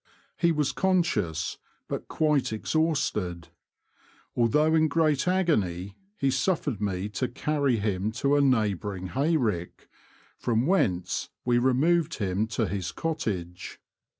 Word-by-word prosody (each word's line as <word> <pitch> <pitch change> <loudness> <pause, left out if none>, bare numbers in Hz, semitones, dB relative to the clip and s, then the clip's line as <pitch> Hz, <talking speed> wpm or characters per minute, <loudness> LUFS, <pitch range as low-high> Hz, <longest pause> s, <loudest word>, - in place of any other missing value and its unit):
He 170 -1 +2
was 150 -2 +1
conscious, 125 - 0 0.3
but - - -4
quite 150 -6 +1
exhausted. 110 - -1 0.9
Although 150 +7 +3
in 160 -1 +4
great 155 0 +1
agony 100 - 0 0.2
he 135 -1 +1
suf 135 +7 0
fered 120 -9 -2
me 95 -1 -1
to 125 +5 -2
carry 140 0 0
him 100 0 -1
to 140 +4 +1
a 145 - +4
neighbouring 105 -7 0
hay 150 - +1
rick, 100 - -3 0.5
from 115 +1 +1
whence 95 - 0 0.2
we 120 -1 +3
removed 145 +6 +2
him 100 0 -1
to 115 0 -1
his 95 -1 -3
cottage. 95 - -4
125 Hz, 125 wpm, -27 LUFS, 100-155 Hz, 0.9 s, in